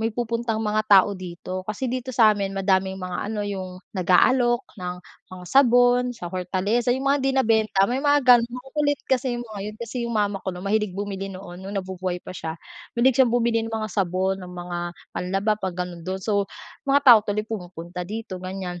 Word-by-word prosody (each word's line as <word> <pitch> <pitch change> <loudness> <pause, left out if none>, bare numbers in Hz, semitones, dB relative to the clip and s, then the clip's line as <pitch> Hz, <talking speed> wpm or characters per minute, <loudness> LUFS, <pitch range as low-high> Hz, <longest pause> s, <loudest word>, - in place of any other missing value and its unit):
may 225 +1 0
pupuntang 230 -1 -2
mga 215 0 +1
tao 200 0 +6
dito. 185 0 -6
Kasi 225 +5 -2
dito 255 0 -4
sa'min 210 -5 +3
madaming 190 0 +1
mga 185 +2 -4
ano, 215 -1 -3
yung 190 -2 -4 0.2
nag-aalok 240 +7 +3 0.2
ng 180 0 -3 0.4
mga 180 -1 -9
sabon, 245 -2 +5
sa 215 - -6
Hortaleza, 190 +6 -1
yung 265 +2 -2
mga 280 - +4
hindi 270 0 +2
nabenta, 220 -5 +2
may 255 +2 -1
mga 290 0 +4
ganun. 240 -2 +6
Makukulit 285 +4 -1
kasi 255 -1 +1
yung 240 - -5
mga 205 - -6
yun, - - -14
kasi 235 +2 -6
yung 235 - -3
mama 205 -2 0
ko, - - -3
'no, 180 +1 -8
mahilig 210 -1 0
bumili 195 -1 -4
noon, 185 -1 -9
nung 200 +1 -5
nabubuhay 185 -1 -3
pa - - -7
siya. 160 -2 -5 0.4
Mahilig 250 +1 +4
siyang 255 - +6
bumili 235 -1 +2
ng 225 - -6
mga 215 -1 -3
sabon, 190 0 0
ng 180 - -9
mga 175 0 -5 0.4
panlaba, 195 +4 0
'pag 185 -2 -3
ganun, 175 -1 -9
dun. 185 - -2
So, 200 -1 0 0.4
mga 280 +1 +5
tao 240 -4 +10
tuloy 210 0 -1
pumupunta 180 -4 -6
dito 215 -4 -6
ganyan. 185 -1 -5
205 Hz, 195 wpm, -24 LUFS, 185-240 Hz, 0.4 s, tao